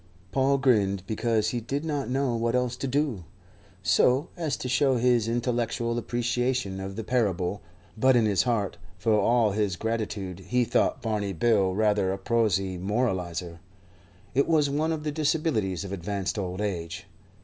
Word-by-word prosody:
Paul 135 Hz, +3 st, +2 dB
grinned, 105 Hz, -8 st, +2 dB
because 110 Hz, +1 st, 0 dB
he 120 Hz, +1 st, -2 dB
did 140 Hz, +7 st, -3 dB
not 145 Hz, -4 st, -2 dB
know 130 Hz, -2 st, 0 dB
what 115 Hz, +1 st, 0 dB
else 125 Hz, -1 st, 0 dB
to 135 Hz, -, -4 dB
do, 135 Hz, -, 0 dB, 0.6 s
so 125 Hz, -, +3 dB
as 160 Hz, -5 st, -2 dB
to -, -, -5 dB
show 130 Hz, 0 st, +2 dB
his 120 Hz, -2 st, +2 dB
intellectual 120 Hz, 0 st, -1 dB
appreciation 120 Hz, -3 st, -1 dB
of 95 Hz, 0 st, -6 dB
the 115 Hz, -, -4 dB
parable; 100 Hz, -5 st, 0 dB, 0.3 s
but 130 Hz, +3 st, +4 dB
in 115 Hz, -2 st, +4 dB
his 100 Hz, -3 st, +3 dB
heart, 115 Hz, -6 st, -1 dB, 0.2 s
for 110 Hz, +5 st, +1 dB
all 115 Hz, 0 st, +3 dB
his 100 Hz, -2 st, 0 dB
gratitude, 105 Hz, -4 st, -3 dB
he 125 Hz, 0 st, +2 dB
thought -, -, +1 dB
Barney 105 Hz, -3 st, -1 dB
bill 95 Hz, 0 st, +2 dB
rather 105 Hz, -2 st, +2 dB
a 95 Hz, -, -2 dB
prosy 95 Hz, -3 st, 0 dB
moralizer. 90 Hz, -5 st, -2 dB, 0.7 s
It 140 Hz, -, +2 dB
was 150 Hz, -4 st, +3 dB
one 155 Hz, +3 st, 0 dB
of 155 Hz, -2 st, -3 dB
the 150 Hz, -, -1 dB
disabilities 145 Hz, -, 0 dB
of 100 Hz, -, -7 dB
advanced 100 Hz, +2 st, -3 dB
old 90 Hz, 0 st, -3 dB
age. 90 Hz, -2 st, -4 dB
115 Hz, 160 wpm, -27 LUFS, 95-125 Hz, 0.7 s, but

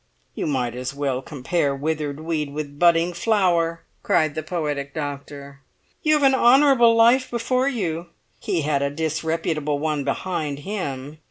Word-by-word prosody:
"You -, -, -3 dB
might 125 Hz, -5 st, -1 dB
as 125 Hz, +2 st, -5 dB
well 135 Hz, -3 st, -1 dB
compare 140 Hz, +1 st, -1 dB
withered 150 Hz, 0 st, -3 dB
weed 155 Hz, -3 st, -2 dB
with 145 Hz, -1 st, -6 dB
budding 170 Hz, 0 st, +4 dB
flower!" 170 Hz, -4 st, +1 dB, 0.2 s
cried 155 Hz, -2 st, +2 dB
the 155 Hz, -, -3 dB
poetic 150 Hz, -4 st, -3 dB
doctor. 140 Hz, -1 st, -6 dB, 0.4 s
"You 310 Hz, 0 st, +3 dB
have 295 Hz, -, +1 dB
an 270 Hz, -1 st, +5 dB
honourable 260 Hz, -2 st, +5 dB
life 240 Hz, +3 st, +4 dB
before 250 Hz, +2 st, 0 dB
you; 175 Hz, -, -3 dB, 0.3 s
he 170 Hz, -, -1 dB
had 145 Hz, -1 st, 0 dB
a 140 Hz, -, +1 dB
disreputable 155 Hz, 0 st, -2 dB
one 150 Hz, -1 st, -1 dB
behind 145 Hz, 0 st, -3 dB
him. 150 Hz, -7 st, -5 dB
155 Hz, 150 wpm, -23 LUFS, 140-180 Hz, 0.4 s, an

